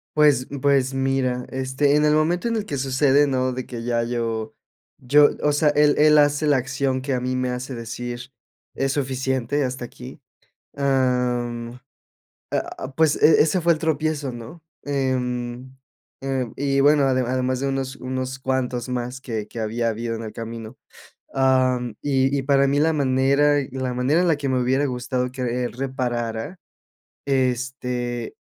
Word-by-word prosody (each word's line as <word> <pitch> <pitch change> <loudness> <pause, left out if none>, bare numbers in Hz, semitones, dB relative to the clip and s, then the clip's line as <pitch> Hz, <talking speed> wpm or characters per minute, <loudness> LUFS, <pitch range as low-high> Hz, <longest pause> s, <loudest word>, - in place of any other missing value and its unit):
Pues 145 -4 +4
pues 135 -1 +2
mira, 135 -2 0
este, 130 +2 +1
en 150 - +3
el 150 0 +4
momento 170 +7 +1
en 230 - 0
el 215 -2 -2
que 145 - -4
sucede, 135 +2 +3
¿no?, 130 -1 0
de 130 0 -5
que 120 -2 -6
ya 120 -1 0
yo 115 -2 -3 0.4
yo 145 +3 +5
o 150 - +3
sea, 150 +1 +3
él 150 0 +4
él 150 0 +6
hace 145 +1 +3
la 145 -2 +4
acción 130 0 -1
que 135 +1 -2
a 125 - 0
mí 130 +1 -2
me 130 0 -1
hace 125 +1 -5
decir: 120 +2 -6 0.4
"Es 135 0 -1
suficiente, 130 0 -1
hasta 125 -1 -3
aquí". 125 +2 -11 0.6
Ah, 125 -3 +1
mm, 120 0 -6 0.8
a - - -3
a 135 +1 -10
pues 160 -2 +2
e 155 - +6
ese 160 +4 +2
fue 170 0 +4
el 155 - -5
tropiezo, 155 -3 -1
¿no?, 120 +7 -10 0.2
em, 130 -2 -2 0.5
eh 135 -3 -2
y 140 0 0
bueno, 145 +1 +5
ade 130 -1 +2
además 130 +1 -1
de 140 - -1
unos 135 -1 -3
unos 130 0 -4
cuantos 130 -2 -2
más 125 +1 -4
que 110 -5 -5
que 115 - -8
había 115 +2 -1
habido 115 +1 -3
en 115 - -6
el 110 - -6
camino, 115 -1 -7 0.6
ah, 130 -1 +3 0.2
y 135 -1 +1
y - - 0
para 140 0 +3
mí 140 +1 +2
la 160 +2 +3
manera 140 +1 +3 0.2
la 130 -1 -3
manera 130 +6 +2
en 180 - +2
la 165 - +3
que 145 -2 -3
me 130 -1 +1
hubiera 130 +3 +1
gustado 125 -1 -2
que 125 -1 -2
él 120 - -2
reparara 125 +3 -3 0.7
este, 125 -2 -2
130 Hz, 175 wpm, -23 LUFS, 125-140 Hz, 0.8 s, él